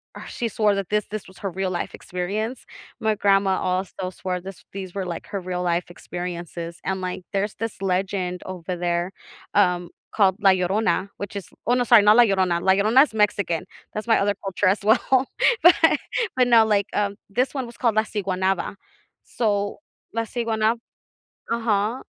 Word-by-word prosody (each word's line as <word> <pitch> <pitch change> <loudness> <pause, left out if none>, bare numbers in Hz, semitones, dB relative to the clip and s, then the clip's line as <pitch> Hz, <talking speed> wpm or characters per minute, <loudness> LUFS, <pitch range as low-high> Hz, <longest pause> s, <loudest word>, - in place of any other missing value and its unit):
ugh, - - -8
she 235 - -3
swore 215 -2 +2
that 195 -2 -3
this 210 0 +1
this 215 -1 -5
was 190 - -16
her 195 - -2
real 190 +1 -2
life 175 - -3
experience. 210 +7 -4 0.3
My 220 0 +1
grandma 195 -2 +3
also 185 0 -2
swore 180 -1 -4
this 190 0 -10
these 190 -2 -7
were, 195 -2 -2
like, 170 -2 -6
her 200 -1 -3
real 180 0 -3
life 175 0 0
experiences, 175 -1 -6
and, 190 0 -1
like, 185 0 -4
there's 200 +1 -1
this 225 -1 -4
legend 185 -1 -1
over 180 -1 -5
there, 175 +1 -1 0.4
um, 180 -3 +3 0.3
called 195 -3 +4
La 195 - +6
Llorona, 190 +2 +1
which 200 0 -6
is 195 -4 -6 0.2
oh 240 - +4
no, 250 - +2
sorry, 230 -2 +7
not 210 +1 +7
La 240 - +9
Llorona- 185 -4 +1
La 190 - +4
Llorona's 220 +8 +4
Mexican, 200 -5 +1 0.3
that's 215 - -4
my 225 - +4
other 205 +1 +1
culture 195 0 0
as 195 +4 +2
well, 255 +4 +3 0.4
but 350 +1 +8 0.6
but 250 -1 +4
not, 230 -2 +6
like, 205 -2 +2
um 200 -1 0
this 250 +6 0
one 265 -3 -2
was 235 0 -12
called 230 -3 +1
La 215 - +4
Siguanaba. 190 -3 -1 0.5
So, 205 -3 -1 0.3
La 230 - 0
Siguanab 225 -1 0 0.7
Uh-huh, 225 +1 0
200 Hz, 180 wpm, -23 LUFS, 185-220 Hz, 0.7 s, La